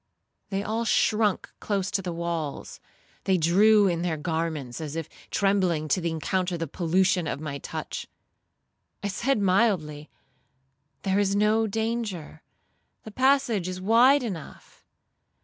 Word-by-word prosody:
They 195 Hz, 0 st, -2 dB
all 220 Hz, +2 st, -1 dB
shrunk 215 Hz, -2 st, +2 dB
close 195 Hz, -2 st, -2 dB
to 195 Hz, -, 0 dB
the 180 Hz, -2 st, -4 dB
walls; 165 Hz, -3 st, -4 dB, 0.5 s
they 190 Hz, -1 st, +3 dB
drew 205 Hz, +6 st, +5 dB
in 170 Hz, -2 st, 0 dB
their 170 Hz, -3 st, -1 dB
garments, 160 Hz, -4 st, -3 dB
as 155 Hz, -1 st, -5 dB
if 165 Hz, -2 st, -4 dB, 0.2 s
trembling 185 Hz, -6 st, +1 dB
to 185 Hz, -, +2 dB
encounter 175 Hz, +2 st, -1 dB
the 165 Hz, -, -2 dB
pollution 180 Hz, +2 st, +1 dB
of 140 Hz, -, -3 dB
my 140 Hz, -2 st, -5 dB
touch. -, -, -6 dB, 1.0 s
I 200 Hz, -, -1 dB
said 235 Hz, +5 st, 0 dB
mildly, 185 Hz, -7 st, +1 dB, 0.9 s
'There 195 Hz, 0 st, +1 dB
is 200 Hz, -1 st, +1 dB
no 215 Hz, +2 st, +3 dB
danger; 220 Hz, -7 st, -3 dB, 0.6 s
the 220 Hz, -, -9 dB
passage 255 Hz, -6 st, +2 dB
is 185 Hz, 0 st, -4 dB
wide 240 Hz, +8 st, +5 dB
enough.' 185 Hz, -10 st, -8 dB
190 Hz, 130 wpm, -26 LUFS, 165-210 Hz, 1.0 s, drew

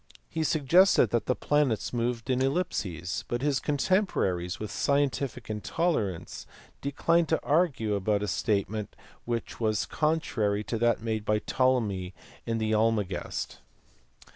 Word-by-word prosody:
He 160 Hz, 0 st, -2 dB
suggested 155 Hz, -, +4 dB
that 120 Hz, -3 st, 0 dB
the 125 Hz, -, +2 dB
planets 145 Hz, -9 st, +1 dB
moved 120 Hz, +1 st, -1 dB
in 130 Hz, 0 st, +1 dB
ellipses, 100 Hz, -, -1 dB
but 120 Hz, +2 st, -2 dB
his 145 Hz, -2 st, +2 dB
contemporaries 135 Hz, -, 0 dB
with 105 Hz, -, -5 dB
scientific 140 Hz, -4 st, 0 dB
intolerance 110 Hz, -, -2 dB, 0.3 s
declined 165 Hz, +4 st, +1 dB
to 160 Hz, -, +1 dB
argue 145 Hz, -9 st, +2 dB
about 100 Hz, +1 st, 0 dB
a -, -, -1 dB
statement 105 Hz, -1 st, -1 dB, 0.3 s
which 115 Hz, -1 st, -3 dB
was 110 Hz, -2 st, +1 dB
contrary 135 Hz, -10 st, 0 dB
to 115 Hz, +1 st, -3 dB
that 120 Hz, -1 st, +2 dB
made 110 Hz, -2 st, -2 dB
by 105 Hz, 0 st, +2 dB
Ptolemy 105 Hz, -6 st, 0 dB, 0.3 s
in 115 Hz, 0 st, 0 dB
the 110 Hz, -1 st, 0 dB
Almagest. 105 Hz, -4 st, -1 dB
115 Hz, 130 wpm, -28 LUFS, 105-145 Hz, 0.3 s, suggested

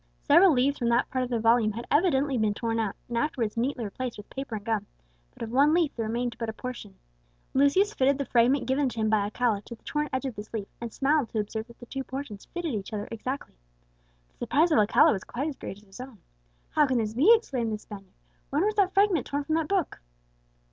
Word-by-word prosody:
Several 380 Hz, 0 st, +6 dB
leaves 275 Hz, +1 st, +2 dB
from 235 Hz, -2 st, +1 dB
that 235 Hz, +1 st, +2 dB
part 255 Hz, -1 st, 0 dB
of 250 Hz, -, -4 dB
the 235 Hz, -2 st, 0 dB
volume 225 Hz, -1 st, +3 dB
had 235 Hz, +3 st, -6 dB
evidently 290 Hz, -4 st, +2 dB
been 215 Hz, -3 st, +1 dB
torn 230 Hz, 0 st, -1 dB
out, 215 Hz, -3 st, -1 dB
and 240 Hz, -, -5 dB
afterwards 235 Hz, -4 st, -1 dB
neatly 245 Hz, +1 st, -1 dB
replaced 245 Hz, +4 st, -5 dB
with 205 Hz, -, -12 dB
paper 270 Hz, -4 st, -5 dB
and 205 Hz, -1 st, -7 dB
gum; 215 Hz, -3 st, -1 dB, 0.4 s
but -, -, -9 dB
of 225 Hz, -, -5 dB
one 285 Hz, +5 st, +4 dB
leaf 335 Hz, -4 st, +1 dB
there 225 Hz, -2 st, -2 dB
remained 235 Hz, +1 st, -2 dB
but 230 Hz, -1 st, -2 dB
a -, -, -4 dB
portion. 235 Hz, -5 st, -7 dB, 0.6 s
Lucius 330 Hz, +10 st, +3 dB
fitted 270 Hz, -3 st, +2 dB
the 280 Hz, -, -2 dB
fragment 250 Hz, +3 st, +3 dB
given 265 Hz, +1 st, +1 dB
to 235 Hz, -, -7 dB
him 220 Hz, 0 st, +1 dB
by 215 Hz, -, +4 dB
Alcala 210 Hz, +1 st, 0 dB
to 235 Hz, -, -10 dB
the -, -, -32 dB
torn 300 Hz, 0 st, -2 dB
edge 260 Hz, +1 st, -2 dB
of 260 Hz, -4 st, -4 dB
this 210 Hz, +1 st, -9 dB
leaf, 205 Hz, -3 st, -4 dB
and 235 Hz, -1 st, -5 dB
smiled 280 Hz, -1 st, +1 dB
to 220 Hz, -, -2 dB
observe 220 Hz, +2 st, -4 dB
that 235 Hz, -, -16 dB
the 240 Hz, -, -11 dB
two 270 Hz, +3 st, -5 dB
portions 260 Hz, -6 st, -7 dB
fitted 345 Hz, -5 st, -4 dB
each 200 Hz, -1 st, -4 dB
other 205 Hz, -1 st, -4 dB
exactly. 255 Hz, +5 st, -5 dB, 0.8 s
The -, -, -37 dB
surprise 325 Hz, +4 st, +3 dB
of 270 Hz, -, +5 dB
Alcala 210 Hz, +1 st, +5 dB
was 195 Hz, -, -4 dB
quite 275 Hz, +5 st, -4 dB
as 290 Hz, -, -6 dB
great 195 Hz, -, -7 dB
as 205 Hz, -, -18 dB
his 195 Hz, +2 st, -15 dB
own. 255 Hz, -3 st, -10 dB, 0.5 s
"How 300 Hz, -1 st, +4 dB
can 260 Hz, -2 st, +1 dB
this 220 Hz, -2 st, -1 dB
be?" 290 Hz, -, +5 dB
exclaimed 255 Hz, -, -2 dB
the 215 Hz, -, -2 dB
Spaniard; 195 Hz, -2 st, -12 dB, 0.3 s
"when 300 Hz, +7 st, +1 dB
was 430 Hz, -, +1 dB
that 390 Hz, -1 st, +2 dB
fragment 390 Hz, -, +3 dB
torn 285 Hz, +1 st, -2 dB
from 310 Hz, +2 st, -2 dB
that 320 Hz, -1 st, +1 dB
book?" 385 Hz, -6 st, -1 dB
245 Hz, 245 wpm, -27 LUFS, 220-285 Hz, 0.8 s, Several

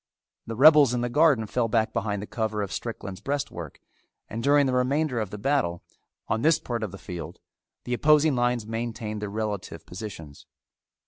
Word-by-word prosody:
The 115 Hz, -, -4 dB
rebels 145 Hz, -1 st, +7 dB
in 120 Hz, -, -1 dB
the 120 Hz, -, -1 dB
garden 145 Hz, -6 st, +4 dB
fell 115 Hz, +2 st, 0 dB
back 110 Hz, 0 st, +1 dB
behind 105 Hz, -2 st, -2 dB
the -, -, -5 dB
cover 110 Hz, -2 st, -2 dB
of 100 Hz, -, -5 dB
Strickland's 100 Hz, -4 st, -5 dB
breastwork 140 Hz, +4 st, -4 dB, 0.5 s
and 115 Hz, -, -5 dB
during 145 Hz, +2 st, +4 dB
the 130 Hz, -, 0 dB
remainder 130 Hz, +1 st, +1 dB
of 105 Hz, -3 st, -2 dB
the 105 Hz, -, -7 dB
battle, 105 Hz, -7 st, 0 dB, 0.4 s
on 110 Hz, -, 0 dB
this 155 Hz, +3 st, +4 dB
part 120 Hz, -2 st, -4 dB
of 110 Hz, -4 st, -3 dB
the 95 Hz, -, -9 dB
field, 85 Hz, -4 st, -8 dB, 0.4 s
the 125 Hz, -, -3 dB
opposing 150 Hz, +3 st, +4 dB
lines 120 Hz, -2 st, +1 dB
maintained 110 Hz, -1 st, -4 dB
these 105 Hz, -, -3 dB
relative 100 Hz, -6 st, -4 dB
positions. 90 Hz, -7 st, -9 dB
115 Hz, 180 wpm, -26 LUFS, 105-135 Hz, 0.5 s, rebels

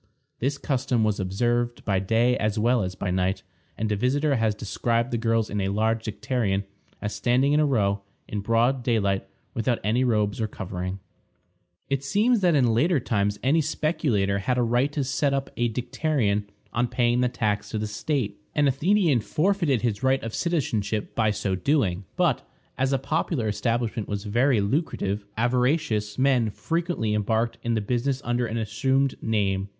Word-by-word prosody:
This 140 Hz, +3 st, 0 dB
custom 130 Hz, -4 st, 0 dB
was 105 Hz, -1 st, +1 dB
observed 120 Hz, +5 st, -1 dB
by 95 Hz, -3 st, +2 dB
day 115 Hz, +6 st, +2 dB
as 105 Hz, 0 st, -1 dB
well 120 Hz, +2 st, +3 dB
as 90 Hz, -1 st, -3 dB
by 95 Hz, -, -2 dB
night, 95 Hz, +1 st, 0 dB, 0.3 s
and 110 Hz, 0 st, -1 dB
a -, -, +2 dB
visitor 140 Hz, +6 st, +1 dB
has 110 Hz, -2 st, +1 dB
described 115 Hz, +3 st, -1 dB
the 120 Hz, -, 0 dB
girls 115 Hz, -1 st, +1 dB
in 105 Hz, 0 st, -2 dB
a 95 Hz, -, 0 dB
large 110 Hz, +3 st, 0 dB
dicterion 105 Hz, -2 st, -1 dB, 0.4 s
as 105 Hz, 0 st, -2 dB
standing 130 Hz, +4 st, +2 dB
in 150 Hz, -, +4 dB
a 150 Hz, -, +3 dB
row, 100 Hz, -6 st, +1 dB, 0.3 s
in 105 Hz, -, -3 dB
broad 115 Hz, +5 st, +2 dB
daylight, 100 Hz, -5 st, 0 dB, 0.3 s
without 115 Hz, +1 st, 0 dB
any 115 Hz, +5 st, +2 dB
robes 105 Hz, -3 st, +1 dB
or 110 Hz, -, +1 dB
covering. 95 Hz, -2 st, -5 dB, 0.9 s
It 140 Hz, -1 st, -1 dB
seems 215 Hz, -, +2 dB
that 180 Hz, -4 st, +3 dB
in 125 Hz, -5 st, +3 dB
later 155 Hz, +7 st, +3 dB
times 105 Hz, -4 st, 0 dB
any 150 Hz, +5 st, +3 dB
speculator 135 Hz, -, 0 dB
had 125 Hz, +6 st, 0 dB
a 125 Hz, -, +3 dB
right 120 Hz, +4 st, +1 dB
to 145 Hz, -, 0 dB
set 140 Hz, +1 st, 0 dB
up 135 Hz, 0 st, -3 dB
a 120 Hz, 0 st, +1 dB
dicterion 120 Hz, -3 st, 0 dB, 0.3 s
on 120 Hz, +1 st, +1 dB
paying 120 Hz, 0 st, +1 dB
the 125 Hz, -, +2 dB
tax 105 Hz, -4 st, -1 dB
to -, -, -3 dB
the 110 Hz, -, -2 dB
state. 105 Hz, -1 st, -2 dB, 0.2 s
An 145 Hz, -1 st, +3 dB
Athenian 160 Hz, -, +3 dB
forfeited 155 Hz, -, +1 dB
his 110 Hz, -4 st, 0 dB
right 130 Hz, 0 st, +2 dB
of 115 Hz, -1 st, -5 dB
citizenship 110 Hz, -, -1 dB
by 110 Hz, -2 st, +2 dB
so 105 Hz, -2 st, -1 dB
doing; 95 Hz, -, 0 dB
but, -, -, +2 dB, 0.3 s
as 135 Hz, +1 st, 0 dB
a 135 Hz, -, +3 dB
popular 150 Hz, -3 st, -1 dB
establishment 115 Hz, +1 st, -1 dB
was 100 Hz, -1 st, -3 dB
very 120 Hz, +2 st, +2 dB
lucrative, 100 Hz, -, -1 dB
avaricious 120 Hz, -2 st, +1 dB
men 130 Hz, -4 st, +3 dB
frequently 165 Hz, -, -2 dB
embarked 110 Hz, +2 st, 0 dB
in 120 Hz, -1 st, 0 dB
the 110 Hz, -, 0 dB
business 125 Hz, +5 st, -1 dB
under 120 Hz, 0 st, 0 dB
an 115 Hz, -, -3 dB
assumed 130 Hz, +5 st, +1 dB
name. 100 Hz, -3 st, 0 dB
120 Hz, 175 wpm, -25 LUFS, 105-135 Hz, 0.9 s, in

